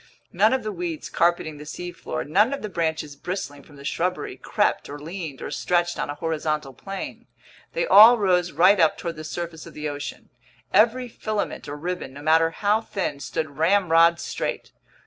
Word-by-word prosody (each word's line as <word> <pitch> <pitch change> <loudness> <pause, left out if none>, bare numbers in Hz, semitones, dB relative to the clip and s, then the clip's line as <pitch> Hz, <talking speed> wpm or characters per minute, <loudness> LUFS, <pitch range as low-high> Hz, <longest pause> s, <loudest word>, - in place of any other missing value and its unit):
None 205 +5 +4
of 260 -2 0
the 215 - -3
weeds 175 -4 -5
carpeting 165 -3 +1
the - - -8
seafloor, 175 +3 -5
none 210 - +3
of 280 - -5
the 215 - -3
branches 160 -4 -2
bristling 145 -3 -5
from 145 - -18
the 140 0 -12
shrubbery, 180 +5 -2
crept, - - 0
or 145 - -6
leaned, 160 -2 -7
or - - -5
stretched 175 -1 0
on - - -2
a 145 - -4
horizontal 155 -3 -2
plane. 195 +8 -7 0.5
They - - 0
all 235 - +9
rose 180 -4 +2
right 185 +6 +5
up 160 -2 +4
toward 170 -1 -4
the 155 - -8
surface 165 0 -6
of - - -13
the 150 0 -4
ocean. 145 0 -7 0.4
Every 235 +5 +4
filament 215 -8 -4
or 145 - -5
ribbon, 175 -2 -5
no 145 +1 -10
matter 160 +1 +4
how 205 +6 +1
thin, 190 -10 -3
stood 145 0 -4
ramrod 170 -1 +4
straight. - - -4
170 Hz, 185 wpm, -24 LUFS, 155-195 Hz, 0.5 s, all